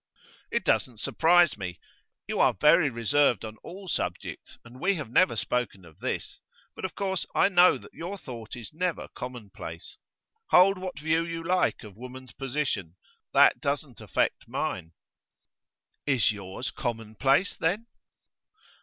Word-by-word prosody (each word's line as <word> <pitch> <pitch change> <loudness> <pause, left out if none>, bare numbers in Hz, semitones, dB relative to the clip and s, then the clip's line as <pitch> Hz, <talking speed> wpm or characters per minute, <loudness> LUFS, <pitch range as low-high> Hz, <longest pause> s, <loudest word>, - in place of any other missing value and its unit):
'It - - 0
doesn't 120 -3 +1
surprise 170 +1 +4
me. 90 -2 -5 0.5
You - - -3
are - - +4
very 150 - +5
reserved 120 0 +2
on 110 0 -8
all 190 - -10
subjects, - - -4
and 120 +2 -13
we 195 +6 +2
have 145 -9 -6
never 185 +9 +4
spoken 110 -7 -2
of 80 -2 -17
this, - - -4 0.4
but - - -9
of 190 - -5
course 190 -3 -1
I - - +5
know 180 -1 +6
that - - -15
your 180 +4 -5
thought 115 - -8
is 120 +1 -9
never 175 0 -2
commonplace. 120 -5 -8 0.5
Hold 185 +1 +6
what 185 -4 -5
view 160 +2 +1
you 165 0 -5
like 180 -6 +1
of 105 -2 -12
woman's 125 +1 -10
position, 135 - -2 0.4
that - - +6
doesn't - - -2
affect - - -1
mine.' 80 +1 -3 1.1
'Is 135 -7 +4
yours 100 +4 -5
commonplace, 120 - 0
then? 200 +8 0
135 Hz, 145 wpm, -28 LUFS, 115-175 Hz, 1.1 s, know